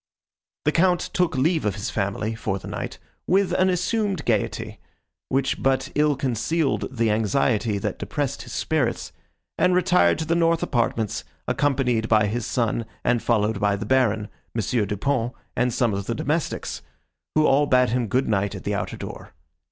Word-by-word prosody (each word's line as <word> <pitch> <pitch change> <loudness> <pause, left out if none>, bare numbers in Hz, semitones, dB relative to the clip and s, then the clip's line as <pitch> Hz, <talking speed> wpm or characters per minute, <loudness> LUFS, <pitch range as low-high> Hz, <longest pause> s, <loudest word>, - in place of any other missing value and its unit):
The 150 - +4
Count 180 +2 +3
took 180 -7 +1
leave 160 +5 +2
of 105 -2 0
his 100 - -4
family, 100 +2 -1
for 100 -3 -2
the - - -9
night, - - -5 0.3
with 190 0 +3
an 185 +1 +3
assumed 185 -1 0
gaiety, 110 -4 -1 0.5
which 135 0 0
but 135 0 +1
ill 150 0 +3
concealed 135 +5 0
the 115 -4 0
anxiety, 110 0 +1
that 100 - -3
depressed - - -2
his - - -10
spirits, - - -1 0.5
and 180 0 +4
retired 180 -2 +4
to 160 - -3
the 165 - +1
north 165 -1 +2
apartments, 115 -4 0 0.2
accompanied 125 -5 +1
by 110 -2 +5
his 110 +2 -2
son 115 -2 -1 0.2
and 120 -2 +2
followed 110 -2 +1
by 100 0 +2
the 100 - -5
Baron, 110 -4 +2 0.3
M. 110 0 +1
Du 105 - -3
Pont 120 +1 0 0.2
and 125 0 +1
some 115 -2 +1
of 100 0 -3
the 115 - -1
domestics, 150 +7 -2 0.5
who 155 0 +4
all 145 +1 +4
bade 125 -3 +4
him 120 0 0
good 130 +6 +1
night 100 -2 0
at - - -8
the - - -1
outer - - -3
door. - - -9
125 Hz, 175 wpm, -24 LUFS, 110-155 Hz, 0.5 s, by